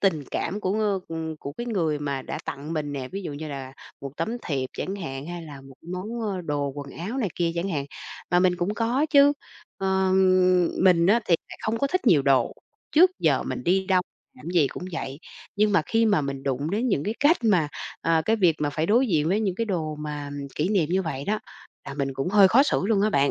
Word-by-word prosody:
tình 160 -8 +1
cảm 205 +2 -2
của, 190 0 -1
ơ, 205 -3 +1
ừm, 160 -1 -4
của 140 -1 -7
cái 240 +10 -6
người 165 -10 0
mà 140 -2 -3
đã - - -5
tặng 145 +3 -5
mình 150 -2 -2
nè, 130 -2 -4
ví 195 +1 -6
dụ 155 - -5
như 155 +2 -6
là 135 -2 -6 0.3
một 140 - -6
tấm 165 +7 -2 0.2
thiệp 130 -4 -2
chẳng 195 +2 -4
hạn, 135 -5 -6
hay 175 -1 -6
là 145 -4 -10
một 135 0 -14 0.2
món, 215 +6 -4
ơ, 200 -4 -2
đồ 145 -3 -2
quần 140 -1 -7
áo 210 +10 -4
này 220 -7 0
kia 170 -1 0
chẳng 170 +3 -2
hạn. 145 -7 -2 0.5
Mà 175 0 +4
mình 180 -1 +3
cũng 190 +5 -1
có 245 +7 +1
chứ, 285 -1 +7 0.5
ờm, 185 -2 +3 0.2
mình 175 -2 +5
á 230 +4 +4
thì 170 - +4
lại - - -10
không 225 +1 -1
có 280 - +1
thích 365 -1 -2
nhiều 155 -9 +5
đồ, 135 -1 +3 0.4
trước 355 +4 +7
giờ - - +2
mình 255 - -5
đi 190 +2 +2
đâu, 185 -1 +3 0.3
làm 130 - -14
cái 175 - +4
gì - - +3
cũng 180 - -7
vậy. 135 -3 -5 0.4
Nhưng 210 0 +3
mà 195 - +4
khi 225 0 +2
mà 205 -7 +3
mình 140 -1 -4
đụng 140 +4 -2
đến 230 +5 0
những 145 -8 0
cái 215 - -2
cách 300 +4 +5
mà 180 -9 +3 0.3
ờ, 165 -1 +2
cái 225 - +2
việc 180 -6 +4
mà 145 -1 0
phải 155 +2 -1
đối 240 +7 +4
diện 160 -6 +1
với 200 +5 +2
những 195 -4 0
cái 230 - -1
đồ 165 -7 -2
mà 150 -1 -5 0.2
kỷ 155 +4 0
niệm 190 -7 +2
như 190 +2 +1
vậy 140 -5 -4
đó, 215 +4 0 0.5
là 140 - -6
mình 140 -1 -2
cũng 135 +5 -2
hơi 195 0 +6
khó 255 +8 +6
xử - - 0
luôn 210 -2 +2
á 215 - +2
bạn. 140 -5 +3
175 Hz, 245 wpm, -25 LUFS, 145-205 Hz, 0.5 s, chứ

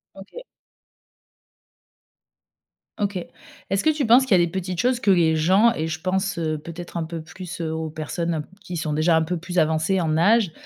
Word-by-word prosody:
OK. 200 - -11 2.5
OK. 205 -2 -1 0.5
Est-ce 195 0 0
que 315 - +4
tu 295 -4 -1
penses 245 +4 +6
qu'il 195 -8 +4
y - - +4
a - - +4
des 165 - -7
petites 185 -2 -4
choses 250 -1 +1
que 205 - 0
les 165 -3 +3
gens, 190 +9 +4
et 160 -7 -3
je 160 0 -5
pense, 190 0 -1
heu, 155 -2 -1
peut-être 170 +3 -8
un 165 - -1
peu 165 0 -6
plus, 180 +2 -8
heu, 160 -1 -2
aux 160 0 -3
personnes 165 +2 -3
un 155 - -2
p - - -13
qui 180 - -7
sont 155 -2 -2
déjà 160 +2 +3
un 160 - +3
peu 175 +2 -2
plus 180 +2 -6
avancées 160 +4 +2
en 155 -1 0
âge, 205 +1 +3
175 Hz, 210 wpm, -23 LUFS, 160-195 Hz, 2.5 s, penses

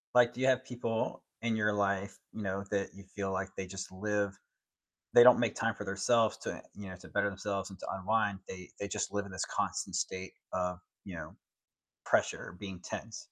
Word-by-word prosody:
Like, 120 -1 +7
do 125 - -5
you 130 - +4
have 130 0 +4
people 115 -3 -1 0.2
in 115 -1 +1
your 105 -1 +3
life, 100 -1 +1 0.2
you 110 - -5
know, 95 -1 -1
that 100 -1 +1
you 100 - -11
feel 100 -1 -1
like 95 0 -1
they 95 - -3
just 95 0 -6
live 100 +1 0 0.8
They 120 - +11
don't 125 0 +10
make 120 -3 +2
time 115 -2 +1
for - - -6
their 95 0 -3
selves 115 +1 +4
to - - -3
en - - -8
you 100 -1 -7
know, 95 - -6
to - - -13
better 100 0 +2
themselves 100 0 -2
and 95 - -10
to - - -5
unwind, 100 +1 +1
they 90 -1 -7
they 100 - -1
just - - -1
live 100 0 0
in 100 - -9
this 95 - -1
constant - - -1
state 95 0 -2 0.2
of, 90 -1 0 0.3
you 95 -3 -7
know, 80 -1 -7 0.7
pressure, 85 - +1
being 95 -3 -6
tense? 115 -1 -6
100 Hz, 215 wpm, -33 LUFS, 95-110 Hz, 0.8 s, They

